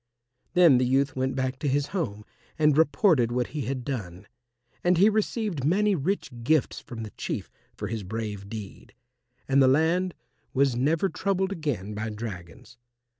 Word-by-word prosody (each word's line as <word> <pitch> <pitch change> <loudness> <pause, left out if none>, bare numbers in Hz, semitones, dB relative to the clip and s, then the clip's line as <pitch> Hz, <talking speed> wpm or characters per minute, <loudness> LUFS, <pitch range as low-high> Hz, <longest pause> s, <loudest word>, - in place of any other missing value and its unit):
Then 170 -8 +7
the 125 - +2
youth 135 +2 +2
went 130 0 -1
back 130 0 -2
to 145 - -2
his 140 +1 +1
home 105 - -3 0.3
and 150 -2 +4
reported 150 - +3
what 125 0 -1
he 150 -4 -3
had 130 -2 -3
done. 100 -8 -5 0.6
And 175 0 +3
he 200 +5 +6
received 215 - -1
many 200 +8 +3
rich 185 +3 -1
gifts 155 +4 +1
from 115 -2 -8
the 105 - -7
Chief - - -5 0.3
for 105 - -4
his 110 +1 -3
brave 105 0 -5
deed, 105 -3 -9 0.5
and 135 +1 +4
the 130 - +6
land 165 +6 +2 0.4
was 135 -2 +3
never 155 +9 +2
troubled 190 0 -1
again 135 - -3
by 110 +2 -3
dragons. 105 -1 -8
135 Hz, 165 wpm, -27 LUFS, 115-165 Hz, 0.6 s, Then